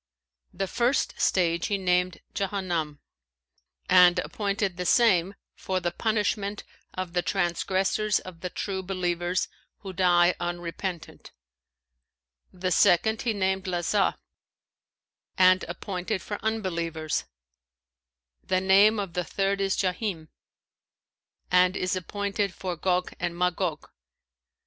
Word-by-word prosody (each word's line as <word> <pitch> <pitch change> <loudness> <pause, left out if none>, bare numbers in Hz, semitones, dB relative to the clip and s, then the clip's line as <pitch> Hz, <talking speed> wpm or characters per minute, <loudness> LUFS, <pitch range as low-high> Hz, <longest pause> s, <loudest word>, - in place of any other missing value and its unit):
The 195 - -2
first 245 +7 0
stage 170 -2 +2
he 205 -2 0
named 180 -1 0
Jahannam[FN#525] 180 -7 -2 0.9
and 180 -1 +6
appointed 200 0 -1
the 180 +1 -4
same 195 -5 +4 0.2
for 185 -1 -2
the 175 -1 -2
punishment 210 0 -1 0.3
of 185 -2 -4
the 175 - +2
transgressors 190 +3 0
of 175 -3 -9
the 180 - -3
True 190 +1 -3
believers, 180 -1 -1 0.3
who 195 -2 -7
die 175 -1 +4
unrepentant; 175 0 -5 1.2
the 185 0 -3
second 205 +5 +4
he 230 - 0
named 190 -1 -1
Lazα 185 +2 +1 1.2
and 185 0 +5
appointed 190 0 -4
for 205 - -6
Unbelievers: 170 - -2 1.2
the 185 -1 +1
name 200 +3 +5
of 195 -4 -4
the 180 - -1
third 195 +3 -1
is 195 -1 0
Jahνm 180 -4 -2 1.2
and 180 +1 +4
is 185 +1 -1
appointed 200 +1 -2
for 185 -2 -4
Gog 180 +2 0
and 175 -1 -3
Magog. 180 -2 -1
185 Hz, 110 wpm, -27 LUFS, 175-200 Hz, 1.2 s, and